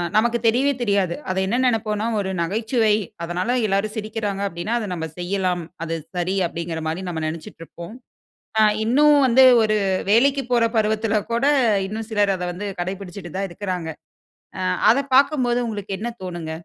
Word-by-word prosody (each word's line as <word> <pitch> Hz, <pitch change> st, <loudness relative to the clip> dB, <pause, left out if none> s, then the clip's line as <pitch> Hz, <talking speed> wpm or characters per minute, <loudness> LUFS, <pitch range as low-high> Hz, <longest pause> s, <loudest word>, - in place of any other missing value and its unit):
நமக்கு 235 Hz, +2 st, +3 dB
தெரியவே 255 Hz, +5 st, +3 dB
தெரியாது. 200 Hz, -6 st, +1 dB
அதை 190 Hz, 0 st, 0 dB
என்ன 235 Hz, +5 st, 0 dB
நெனைப்போன்னா, 220 Hz, -2 st, 0 dB
"ஒரு 190 Hz, -1 st, -2 dB
நகைச்சுவை, 220 Hz, +4 st, +1 dB, 0.3 s
அதனால 180 Hz, +7 st, -2 dB, 0.2 s
எல்லாரும் 200 Hz, +2 st, 0 dB
சிரிக்கிறாங்க 210 Hz, -2 st, -3 dB
அப்டின்னா, 175 Hz, +5 st, -4 dB
அத 215 Hz, -, -4 dB
நம்ப 160 Hz, -2 st, -4 dB
செய்யலாம். 180 Hz, -1 st, -1 dB, 0.2 s
அது 165 Hz, 0 st, -3 dB, 0.2 s
சரி." 180 Hz, +2 st, -1 dB
அப்டிங்கிற 165 Hz, -1 st, -5 dB
மாரி 165 Hz, +4 st, -3 dB
நம்ம 160 Hz, -2 st, -4 dB
நெனைச்சுட்டு 165 Hz, +4 st, -7 dB
இருப்போம். 170 Hz, +3 st, -10 dB, 0.7 s
அ -, -, +6 dB, 0.2 s
இன்னும் 290 Hz, +6 st, +5 dB
வந்து 260 Hz, +2 st, +6 dB, 0.2 s
ஒரு 215 Hz, -1 st, +2 dB, 0.3 s
வேலைக்குப் 265 Hz, +3 st, +3 dB
போற 235 Hz, -1 st, +4 dB
பருவத்தில 220 Hz, 0 st, +1 dB, 0.2 s
கூட 235 Hz, +3 st, +1 dB, 0.4 s
இன்னும் 220 Hz, +3 st, -6 dB
சிலர் 205 Hz, -2 st, +2 dB
அத 180 Hz, -, -7 dB
வந்து 195 Hz, +4 st, -6 dB
கடைபிடிச்சுட்டு 185 Hz, 0 st, -6 dB
தான் 195 Hz, 0 st, -2 dB
இருக்குறாங்க. 180 Hz, -2 st, -4 dB, 0.7 s
அ -, -, -3 dB, 0.3 s
அத 250 Hz, -, +2 dB, 0.2 s
பார்க்கும்போது 260 Hz, -4 st, +3 dB
உங்களுக்கு 205 Hz, -2 st, -5 dB
என்ன 235 Hz, +2 st, -3 dB
தோணுங்க? 175 Hz, -3 st, -5 dB
205 Hz, 155 wpm, -22 LUFS, 180-225 Hz, 0.7 s, அ